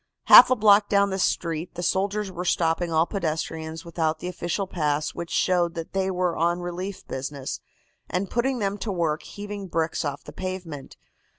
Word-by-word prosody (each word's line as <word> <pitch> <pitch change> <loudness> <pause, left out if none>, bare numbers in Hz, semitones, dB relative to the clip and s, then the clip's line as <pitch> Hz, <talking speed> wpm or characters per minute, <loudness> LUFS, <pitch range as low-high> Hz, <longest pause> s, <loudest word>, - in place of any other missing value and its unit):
"Half - - +10
a 255 - +4
block 205 -2 +5
down 200 -1 +3
the 190 - -2
street 170 -2 -1
the 175 - -4
soldiers 200 +2 0
were 180 0 -5
stopping 170 -1 +1
all 160 +1 +3
pedestrians 160 -2 -4
without 160 -2 -1
the 180 - -6
official 180 +2 -2
pass 150 -4 -1
which 170 -1 -6
showed 175 -2 +1
that 165 -1 -6
they 190 0 0
were 180 -2 0
on 170 +2 +1
relief 180 +2 -5
business, 135 0 -5 0.5
and 185 +2 -1
putting 250 +5 0
them 200 -2 -2
to 215 - -3
work 165 -4 -1
heaving 205 -1 -7
bricks 165 -2 -1
off 145 -1 -4
the 150 - -11
pavement. 180 -5 -6
175 Hz, 180 wpm, -25 LUFS, 160-195 Hz, 0.5 s, Half